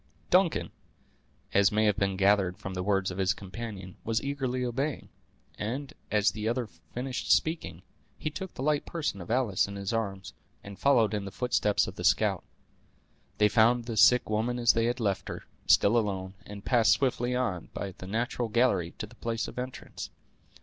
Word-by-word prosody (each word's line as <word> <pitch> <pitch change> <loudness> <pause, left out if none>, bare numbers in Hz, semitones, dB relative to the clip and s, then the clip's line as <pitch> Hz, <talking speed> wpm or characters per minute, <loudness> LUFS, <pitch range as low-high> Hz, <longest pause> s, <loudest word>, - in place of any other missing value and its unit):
Duncan, 180 -2 +3 0.8
as 100 0 +5
may 105 0 +3
be 100 -1 -1
gathered 95 -2 +3
from 95 - -6
the 90 - -3
words 95 -1 +1
of 90 - -6
his 95 +1 +2
companion, 100 -2 -8
was 115 0 0
eagerly 130 -3 -2
obeying; 135 +5 -2 0.5
and, 130 +7 -4 0.2
as 105 0 +3
the 110 0 -4
other 120 +1 0
finished 120 +8 -5
speaking, 160 +1 +1 0.3
he 155 - -3
took 190 +3 -7
the 130 - -4
light 150 0 +1
person 150 - -3
of 90 - -10
Alice 115 -6 +2
in 100 - -7
his 100 +2 -3
arms, 100 -4 -3 0.3
and 100 -1 -10
followed 120 -7 +4
in 105 -2 -2
the - - -5
footsteps 115 -2 +1
of - - -8
the - - -5
scout. - - +2 0.9
They 105 - +5
found 115 +3 +4
the 115 -1 -4
sick 125 +3 +6
woman 110 +3 0
as 120 -1 +4
they 115 0 +1
had 120 +2 0
left 100 -4 -1
her, - - -6 0.2
still 100 +4 +5
alone, 95 -4 -1
and 100 -1 -9
passed 120 -3 +5
swiftly 125 -2 0
on, 105 -10 -2
by 100 - -5
the 90 - -7
natural 120 +3 -1
gallery, 105 -7 +2
to - - -4
the - - -16
place 115 -1 -3
of - - -7
entrance. 130 0 -6
110 Hz, 185 wpm, -29 LUFS, 100-125 Hz, 0.9 s, sick